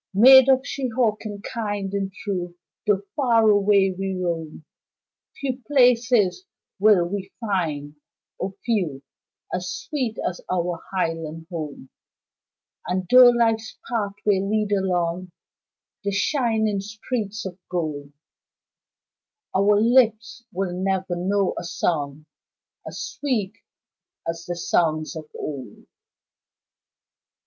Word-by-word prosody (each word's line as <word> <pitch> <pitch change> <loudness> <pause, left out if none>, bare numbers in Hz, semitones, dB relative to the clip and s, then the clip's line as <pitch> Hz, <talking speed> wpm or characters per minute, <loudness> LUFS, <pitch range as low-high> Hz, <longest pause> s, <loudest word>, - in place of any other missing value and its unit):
Maid 265 +5 +9
of 260 0 +4
Shehawken, 220 -6 -2
kind 205 -4 -3
and 195 -1 -2
true, 190 -4 -4 0.3
Tho' 200 -1 +2
far 235 -5 +3
away 200 -1 +4
we 195 0 -3
roam, 165 -4 -4 0.7
Few 260 -2 -3
places 245 - +3 0.4
will 200 -4 +5
we 195 +1 -5
find, 160 -9 -2 0.4
O 190 0 -3
few 180 - -1 0.5
As 180 0 -2
sweet 255 -8 -3
as 180 - -4
our 175 -2 -1
highland 165 -3 -2
home, 150 -5 -6 1.0
And 185 +1 -1
tho' 250 -1 +10
Life's 225 -2 +1
pathway 205 -3 0
lead 210 +1 0
along 180 -2 0 0.7
The 200 - 0
shining 220 -2 +1
streets 215 0 -4
of 185 0 -7
gold, 150 -5 -3 1.4
Our 205 +2 +4
lips 230 -1 +3
will 190 -2 -2
never 190 0 -1
know 190 +2 0
a - - -6
song 150 -4 -2 0.6
As - - -7
sweet 225 -9 -2 0.7
as 165 0 -4
the 175 - -2
songs 160 -1 0
of 155 -1 -8
old. 130 -8 -7
195 Hz, 105 wpm, -23 LUFS, 175-220 Hz, 1.4 s, tho